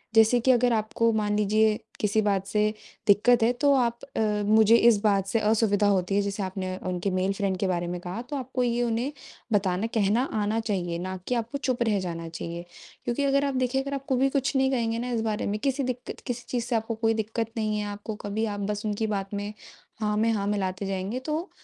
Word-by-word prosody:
जैसे 225 Hz, +2 st, +6 dB
कि 260 Hz, +3 st, +4 dB
अगर 245 Hz, -1 st, +3 dB
आपको 225 Hz, +1 st, +1 dB
मान 210 Hz, -1 st, 0 dB
लीजिए 215 Hz, +1 st, +3 dB, 0.2 s
किसी 210 Hz, +1 st, +2 dB
बात 200 Hz, -2 st, 0 dB
से 210 Hz, +1 st, +1 dB, 0.3 s
दिक्कत 225 Hz, +4 st, +5 dB
है, 230 Hz, -, +4 dB
तो 280 Hz, +3 st, +3 dB
आप 235 Hz, -2 st, +1 dB, 0.2 s
अ, 210 Hz, -1 st, +1 dB
मुझे 220 Hz, +1 st, +6 dB
इस 235 Hz, -3 st, +5 dB
बात 200 Hz, -2 st, +2 dB
से 225 Hz, +3 st, +1 dB
असुविधा 210 Hz, -1 st, +2 dB
होती 195 Hz, -1 st, +1 dB
है 205 Hz, -, +4 dB
जैसे 200 Hz, 0 st, -2 dB
आपने 185 Hz, 0 st, -3 dB
उनके 180 Hz, +2 st, -1 dB
मेल 185 Hz, +1 st, +1 dB
फ्रेंड 195 Hz, -1 st, -1 dB
के 195 Hz, -, +1 dB
बारे 175 Hz, -1 st, -1 dB
में 175 Hz, 0 st, -3 dB
कहा 180 Hz, +6 st, -5 dB
तो 290 Hz, -, -3 dB
आपको 255 Hz, -1 st, -2 dB
ये 240 Hz, 0 st, +1 dB
उन्हें 240 Hz, +4 st, -1 dB, 0.4 s
बताना 195 Hz, +1 st, +1 dB
कहना 220 Hz, +3 st, +2 dB
आना 215 Hz, +1 st, 0 dB
चाहिए, 185 Hz, -6 st, -2 dB
ना 185 Hz, +1 st, -4 dB
कि 250 Hz, -, +1 dB
आपको 235 Hz, +4 st, -2 dB
चुप 255 Hz, -3 st, 0 dB
रह 210 Hz, -4 st, +1 dB
जाना 165 Hz, -2 st, -4 dB
चाहिए, 170 Hz, +1 st, -6 dB, 0.4 s
क्योंकि 240 Hz, +4 st, 0 dB
अगर 275 Hz, 0 st, +2 dB
आप 275 Hz, -1 st, -1 dB
देखें 255 Hz, +1 st, +1 dB
अगर 280 Hz, +1 st, -5 dB
आप 275 Hz, -1 st, -4 dB
को 265 Hz, -, +3 dB
भी 270 Hz, +2 st, +3 dB
कुछ 275 Hz, +1 st, 0 dB
नहीं 265 Hz, 0 st, +3 dB
कहेंगे 230 Hz, -3 st, 0 dB
ना 245 Hz, -, -3 dB
इस 230 Hz, -, 0 dB
बारे 220 Hz, -2 st, -1 dB
में 210 Hz, +1 st, -1 dB
किसी 275 Hz, +3 st, 0 dB
दिक्कत 255 Hz, -1 st, -4 dB
किसी 245 Hz, -1 st, -4 dB
चीज़ 240 Hz, -2 st, -1 dB
से 245 Hz, -1 st, -1 dB
आपको 225 Hz, 0 st, -1 dB
कोई 225 Hz, 0 st, +1 dB
दिक्कत 225 Hz, +1 st, -2 dB
नहीं 215 Hz, -1 st, 0 dB
है 210 Hz, -, -2 dB
आपको 205 Hz, +1 st, -6 dB
कभी 210 Hz, +2 st, -1 dB
आप 205 Hz, -2 st, -3 dB
बस 210 Hz, +1 st, -4 dB
उनकी 215 Hz, +1 st, -1 dB
बात 195 Hz, -1 st, -3 dB
में 205 Hz, +1 st, -3 dB, 0.5 s
हाँ 210 Hz, -1 st, +1 dB
में 225 Hz, +2 st, +3 dB
हाँ 200 Hz, -2 st, -1 dB
मिलाते 195 Hz, -1 st, -1 dB
जाएँगे 195 Hz, +5 st, -2 dB
तो, 310 Hz, +7 st, -3 dB
220 Hz, 230 wpm, -26 LUFS, 200-240 Hz, 0.5 s, जैसे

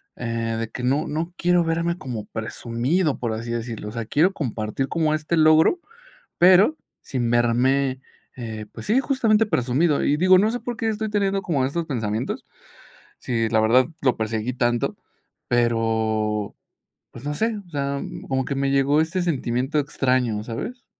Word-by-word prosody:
eh, 115 Hz, -1 st, -2 dB
de 115 Hz, -, -2 dB
que 125 Hz, -, -6 dB
no 140 Hz, +5 st, +1 dB
no 160 Hz, +3 st, -3 dB
quiero 175 Hz, 0 st, +3 dB
verme 170 Hz, +1 st, -1 dB
como 120 Hz, -, -6 dB
presumido, 120 Hz, -, -1 dB
por 115 Hz, -2 st, -2 dB
así 115 Hz, +2 st, -5 dB
decirlo. 115 Hz, -2 st, -4 dB
O -, -, -8 dB
sea, 115 Hz, 0 st, -4 dB
quiero 160 Hz, -, +2 dB
compartir 120 Hz, -, -3 dB
como 160 Hz, -2 st, 0 dB
este 155 Hz, +2 st, -1 dB
logro, 155 Hz, -, +5 dB, 0.6 s
pero 190 Hz, -, +6 dB, 0.2 s
sin 120 Hz, -3 st, -2 dB
verme, 130 Hz, +3 st, +2 dB, 0.4 s
eh, 110 Hz, -3 st, -6 dB
pues -, -, -9 dB
sí, 225 Hz, +5 st, +3 dB
justamente 225 Hz, -6 st, +2 dB
presumido. 140 Hz, -, +1 dB
Y, 145 Hz, -, +2 dB
digo, 185 Hz, +2 st, +6 dB
no 215 Hz, +4 st, +3 dB
sé 245 Hz, -, -3 dB
por 240 Hz, -2 st, -5 dB
qué 225 Hz, -, -1 dB
estoy 220 Hz, 0 st, -2 dB
teniendo 200 Hz, -2 st, 0 dB
como 140 Hz, -9 st, 0 dB
estos 165 Hz, +5 st, -2 dB
pensamientos, 110 Hz, -4 st, -3 dB, 0.7 s
si 115 Hz, -2 st, -1 dB
la 110 Hz, -, +2 dB
verdad 120 Hz, +4 st, +4 dB, 0.2 s
lo 130 Hz, -3 st, +2 dB
perseguí 110 Hz, +2 st, -2 dB
tanto, 120 Hz, -1 st, 0 dB, 0.5 s
pero, 110 Hz, -3 st, 0 dB, 0.6 s
pues 120 Hz, -, -11 dB
no 150 Hz, 0 st, -2 dB
sé, 225 Hz, +5 st, 0 dB
o 175 Hz, -, -19 dB
sea, 140 Hz, -1 st, -2 dB
mm, -, -, -7 dB
como 130 Hz, -1 st, 0 dB
que 140 Hz, +1 st, -3 dB
me 135 Hz, 0 st, 0 dB
llegó 140 Hz, +2 st, +3 dB
este 170 Hz, +4 st, 0 dB
sentimiento 135 Hz, -3 st, -1 dB
extraño, 130 Hz, -6 st, 0 dB
¿sabes? 175 Hz, -, -6 dB
135 Hz, 170 wpm, -23 LUFS, 115-170 Hz, 0.7 s, pero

